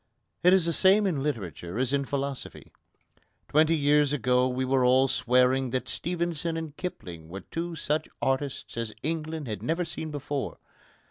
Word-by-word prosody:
It 180 - +7
is 185 -3 +5
the 170 - +1
same 195 +5 +5
in 165 -8 0
literature 100 - -4
as 130 +1 0
in 140 -1 +1
philosophy. 140 -1 -5 0.8
Twenty 155 +2 +4
years 145 0 +3
ago 125 -1 +2
we 130 +1 -1
were 130 0 +2
all 130 +2 +5
swearing 125 +1 +2
that 130 +1 -2
Stevenson 170 -2 -2
and 160 -3 -6
Kipling 85 - -7
were 95 +3 -7
two 170 0 -5
such 155 -1 -1
artists 135 -2 -2
as 115 -2 -3
England 160 -1 -3
had 105 -2 -4
never 165 +2 -1
seen 160 -1 -5
before. 145 -1 -4
140 Hz, 160 wpm, -27 LUFS, 125-160 Hz, 0.8 s, It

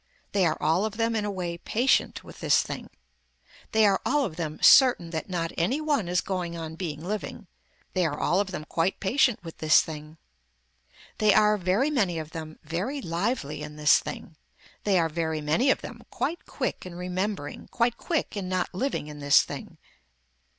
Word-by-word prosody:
They 190 -4 +3
are 155 - 0
all 165 +5 +2
of 215 0 -3
them 230 0 +1
in 215 -1 0
a - - -1
way 175 -3 -4
patient 245 +8 +1
with - - -13
this - - +3
thing. - - -7 0.8
They 220 -1 +4
are 195 -2 +3
all 290 0 +2
of 165 - -5
them 155 -2 -4
certain 245 -11 +6
that 160 +3 -4
not 170 -2 -2
any 210 - +1
one 295 - 0
is 180 +1 +1
going 180 -3 -3
on 160 -1 -6
being 160 -2 -5
living. 210 +2 -4 0.5
They 180 -3 +2
are 145 -1 -4
all 180 - +2
of 200 -1 0
them 155 -5 -6
quite 165 +4 -1
patient 235 0 +2
with 165 -1 -10
this 155 -1 +6
thing. 155 0 -8 1.0
They 210 -2 +5
are, 210 0 +5
very 205 - +1
many 195 - +1
of 155 -1 -6
them, 155 -1 -7
very 180 - -3
lively 170 - -2
in 150 0 -7
this 150 0 +5
thing. 160 - -8 0.5
They 200 -2 +3
are, 165 -2 +3
very 160 -1 -2
many 155 - +2
of - - +2
them - - -9
quite 340 +2 -3
quick - - -3
in 180 -2 -9
remembering, 180 -2 -4
quite 235 0 0
quick 325 -9 -2
in 190 -3 -4
not 185 0 -1
living 255 - -2
in 150 -1 -9
this 145 0 +5
thing. - - -8
180 Hz, 190 wpm, -27 LUFS, 160-215 Hz, 1.0 s, certain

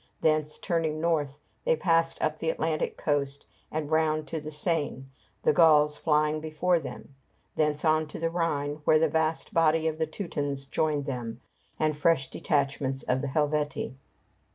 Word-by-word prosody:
Thence, 155 -1 +1
turning 160 -3 -1
north, 155 -4 0 0.3
they - - +3
passed 165 - +1
up 155 0 0
the 160 - -1
Atlantic 160 -1 -1
coast 140 -2 -1 0.3
and 155 -1 -3
round 155 -1 +1
to 160 +1 -3
the 150 - -6
Seine, 150 -3 -1 0.4
the - - +4
Gauls 150 -2 +5
flying 155 0 +1
before 160 +3 +1
them; 140 -1 -9 0.4
thence 150 0 +1
on 155 0 +3
to 150 - -8
the 165 0 -1
Rhine, 150 -4 -1
where 155 - +5
the 160 +1 +3
vast 160 +1 -1
body 160 -1 +3
of 155 0 -2
the 160 - +1
Teutons 145 -6 -3
joined 145 0 0
them, 120 -4 -4 0.4
and 155 -1 +1
fresh 150 -2 +2
detachments 135 -2 -1
of 130 +1 0
the 140 - -2
Helvetii. 150 -1 -1
155 Hz, 160 wpm, -28 LUFS, 145-160 Hz, 0.4 s, Gauls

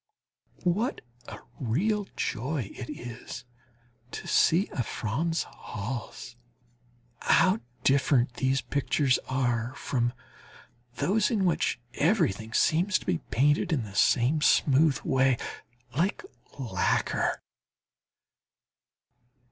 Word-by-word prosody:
What 205 +9 0 0.3
a - - -7 0.2
real 195 - 0
joy 125 -1 -2
it 125 - -8
is 120 +1 -8 0.6
to - - -7
see 180 +6 +4
a 130 - -2
Franz 145 +10 -1
Hals! 115 +2 -7 0.8
How 190 +4 +4 0.2
different 135 -2 +3
these 130 +2 0
pictures 140 -2 +1
are 125 -2 0
from 120 -2 -1 0.8
those 210 - +2
in 210 -5 +1
which 165 -7 +1
everything 140 - +1
seems 175 - +3
to - - -12
be 85 - 0
painted 145 - +2
in 140 -7 +1
the 100 -2 -9
same 125 +8 +3
smooth 145 0 +4
way, 130 -1 +2 0.6
like 190 - 0 0.3
lacquer. 130 -5 0
135 Hz, 100 wpm, -28 LUFS, 120-165 Hz, 0.8 s, see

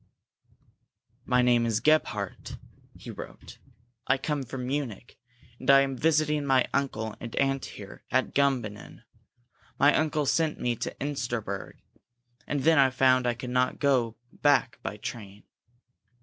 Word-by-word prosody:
"My 125 -1 +3
name 120 -1 +4
is 110 -1 +1
Gebhardt," 120 -8 0 0.4
he - - -9
wrote. - - -11 0.5
"I - - +3
come 145 +1 -2
from 130 0 -6
Munich, 125 -5 -4 0.4
and 130 - -5
I 135 0 +8
am 135 -1 -1
visiting 150 +1 +1
my 135 -2 +3
uncle 110 -6 -2
and 115 -2 -7
aunt 135 0 0
here 100 -2 -11
at 130 0 0
Gumbinnen. 125 -7 -1 0.7
My 145 +1 +5
uncle 155 -1 +1
sent 160 +2 +1
me 120 -1 0
to - - -4
Insterberg 120 -8 -3 0.7
and 145 -2 -1
then 160 +1 +4
I 135 -1 +6
found 130 -1 +3
I 120 - +1
could 125 +1 -7
not 125 0 +1
go 125 -6 +1 0.2
back 140 -4 +3
by 105 - -5
train. 105 -4 -8
130 Hz, 140 wpm, -27 LUFS, 120-140 Hz, 0.7 s, I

